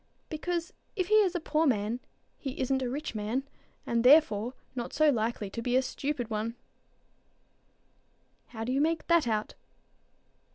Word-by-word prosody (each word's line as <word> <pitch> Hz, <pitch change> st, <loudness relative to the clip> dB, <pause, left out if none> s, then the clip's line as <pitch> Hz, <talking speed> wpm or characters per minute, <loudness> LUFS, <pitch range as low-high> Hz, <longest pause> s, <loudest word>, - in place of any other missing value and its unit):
"Because 340 Hz, +2 st, -3 dB, 0.2 s
if 370 Hz, -4 st, -1 dB
he -, -, +2 dB
is 375 Hz, -3 st, +1 dB
a -, -, +1 dB
poor 315 Hz, 0 st, +1 dB
man, 220 Hz, -1 st, 0 dB, 0.4 s
he 270 Hz, -2 st, -5 dB
isn't 265 Hz, 0 st, +1 dB
a 250 Hz, -, -1 dB
rich 290 Hz, +3 st, -4 dB
man, 220 Hz, +5 st, -2 dB, 0.4 s
and 235 Hz, 0 st, +1 dB
therefore 250 Hz, -4 st, +5 dB, 0.2 s
not 245 Hz, -2 st, -5 dB
so 310 Hz, 0 st, +5 dB
likely 225 Hz, -3 st, -1 dB
to 230 Hz, -, -4 dB
be 245 Hz, +1 st, 0 dB
a 260 Hz, -, +4 dB
stupid." 275 Hz, -1 st, -3 dB, 2.2 s
"How 225 Hz, -2 st, -6 dB
do 240 Hz, -, -2 dB
you 270 Hz, +2 st, +2 dB
make 325 Hz, +1 st, +1 dB
that 335 Hz, -6 st, +3 dB
out?" 215 Hz, -2 st, -1 dB
260 Hz, 155 wpm, -29 LUFS, 235-310 Hz, 2.2 s, therefore